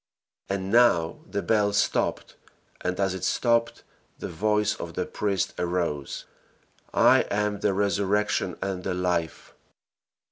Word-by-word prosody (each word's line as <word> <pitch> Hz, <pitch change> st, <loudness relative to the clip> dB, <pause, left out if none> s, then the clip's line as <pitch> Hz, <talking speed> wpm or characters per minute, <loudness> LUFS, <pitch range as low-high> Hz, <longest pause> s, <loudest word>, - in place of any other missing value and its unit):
And 95 Hz, 0 st, -2 dB
now 115 Hz, -9 st, +4 dB
the 100 Hz, -, -2 dB
bell 105 Hz, -2 st, +2 dB
stopped, 100 Hz, -, 0 dB, 0.5 s
and 90 Hz, +1 st, -2 dB
as 95 Hz, -1 st, +1 dB
it 95 Hz, -, -6 dB
stopped, 115 Hz, -1 st, +1 dB, 0.3 s
the -, -, -6 dB
voice 105 Hz, +5 st, +1 dB
of -, -, -8 dB
the -, -, -1 dB
priest 100 Hz, -3 st, -1 dB
arose, 85 Hz, -5 st, -2 dB, 0.7 s
"I -, -, +5 dB
am 105 Hz, 0 st, 0 dB
the 105 Hz, -, +1 dB
resurrection 100 Hz, -1 st, 0 dB
and 95 Hz, -2 st, -3 dB
the 90 Hz, -1 st, -2 dB
life." 90 Hz, -2 st, -2 dB
100 Hz, 130 wpm, -26 LUFS, 90-105 Hz, 0.7 s, I